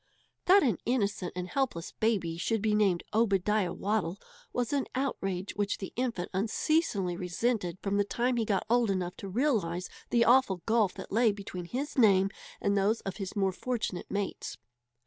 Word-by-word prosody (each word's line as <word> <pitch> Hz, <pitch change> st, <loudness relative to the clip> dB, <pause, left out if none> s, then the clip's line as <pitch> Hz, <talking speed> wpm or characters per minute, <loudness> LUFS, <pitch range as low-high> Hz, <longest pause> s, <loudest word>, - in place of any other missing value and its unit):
That 385 Hz, +1 st, +7 dB
an 230 Hz, -, +1 dB
innocent 200 Hz, -7 st, 0 dB
and 180 Hz, 0 st, -3 dB
helpless 245 Hz, -9 st, -2 dB
baby 200 Hz, -7 st, 0 dB
should 225 Hz, +6 st, 0 dB
be 215 Hz, +1 st, +1 dB
named 200 Hz, -5 st, +2 dB
Obadiah 210 Hz, -3 st, +2 dB
Waddle 200 Hz, -3 st, -1 dB, 0.3 s
was 245 Hz, +1 st, -1 dB
an 280 Hz, -2 st, 0 dB
outrage 195 Hz, -8 st, -2 dB
which 205 Hz, -1 st, 0 dB
the 190 Hz, -, -7 dB
infant 235 Hz, -8 st, -2 dB
unceasingly 205 Hz, -, +1 dB
resented 180 Hz, +1 st, -1 dB
from 200 Hz, 0 st, 0 dB
the 205 Hz, -, +4 dB
time 245 Hz, +4 st, 0 dB
he 230 Hz, -, +2 dB
got 205 Hz, -3 st, 0 dB
old 235 Hz, -1 st, +3 dB
enough 180 Hz, -2 st, -1 dB
to 195 Hz, -, -7 dB
realize 190 Hz, -, 0 dB, 0.2 s
the 235 Hz, -1 st, +4 dB
awful 235 Hz, -8 st, +4 dB
gulf 220 Hz, -4 st, +2 dB
that -, -, -8 dB
lay 225 Hz, +1 st, +4 dB
between 195 Hz, -3 st, -6 dB
his 265 Hz, -, -3 dB
name 195 Hz, -4 st, +5 dB, 0.3 s
and 200 Hz, 0 st, +1 dB
those 205 Hz, +3 st, +2 dB
of 195 Hz, -, -5 dB
his 195 Hz, -3 st, -5 dB
more 195 Hz, -2 st, +2 dB
fortunate 215 Hz, -2 st, -3 dB
mates. 200 Hz, -1 st, -3 dB
205 Hz, 170 wpm, -30 LUFS, 185-235 Hz, 0.3 s, That